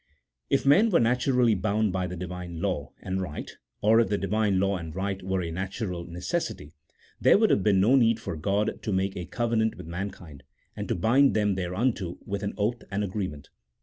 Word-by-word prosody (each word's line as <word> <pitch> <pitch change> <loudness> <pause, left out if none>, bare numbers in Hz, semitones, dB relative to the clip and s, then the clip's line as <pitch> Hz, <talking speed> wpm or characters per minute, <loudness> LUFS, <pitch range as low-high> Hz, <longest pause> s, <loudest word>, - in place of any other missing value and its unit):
If 140 - +1
men 190 +12 +6
were 175 - +4
naturally 125 0 +3
bound 105 +1 0
by 95 -1 -1
the 90 - -6
Divine 90 -1 -6
law 85 -6 -2
and 95 0 -2
right, 80 -5 -5 0.3
or 110 +2 +5
if 115 - +2
the 105 - +1
Divine 100 0 +1
law 100 0 +1
and 80 -2 -7
right 95 0 -2
were 95 0 -1
a 85 - -4
natural 95 0 -4
necessity, 90 - -4 0.5
there - - +6
would 220 +1 +3
have - - +3
been 100 -1 +3
no 110 +8 +5
need 115 -3 +4
for 100 - -5
God 100 +6 -1
to 105 - -3
make 95 0 0
a 90 - -4
covenant 115 -2 0
with - - -9
mankind, 85 -4 -7 0.3
and - - -5
to - - 0
bind 130 +10 +4
them 105 -2 +2
thereto 95 0 -1
with 100 0 -3
an 100 - -3
oath 110 +3 -1
and 100 +1 -1
agreement. 90 -8 -4
100 Hz, 200 wpm, -27 LUFS, 90-110 Hz, 0.5 s, men